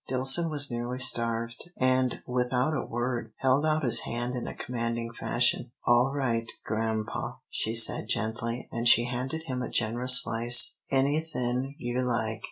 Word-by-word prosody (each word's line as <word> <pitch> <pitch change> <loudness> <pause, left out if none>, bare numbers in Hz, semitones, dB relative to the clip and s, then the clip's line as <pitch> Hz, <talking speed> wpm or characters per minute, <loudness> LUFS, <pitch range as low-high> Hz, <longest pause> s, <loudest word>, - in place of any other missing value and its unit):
Dillson 135 +6 +4
was 145 -3 0
nearly 120 +1 -5
starved, 115 +2 0
and, 130 -1 0
without 125 +3 -1
a 155 - -3
word, 120 -2 -5
held 135 +3 +1
out 155 0 0
his 125 - +6
hand 120 +1 -4
in 125 -2 -5
a - - -7
commanding 115 -1 -5
fashion. 120 +1 +1 0.2
"All 120 +2 +3
right, 120 -5 -2 0.2
grampa," 110 0 -4
she 110 +1 -2
said, 115 - +3
gently, 115 +1 -3
and 120 +1 -2
she 120 0 +6
handed 130 +6 -5
him 130 -5 -5
a - - -5
generous 125 +3 +4
slice; 120 +1 +5
"anythin' 135 -2 -2
you 120 +1 -3
like. 110 -3 -3
125 Hz, 155 wpm, -27 LUFS, 115-130 Hz, 0.2 s, his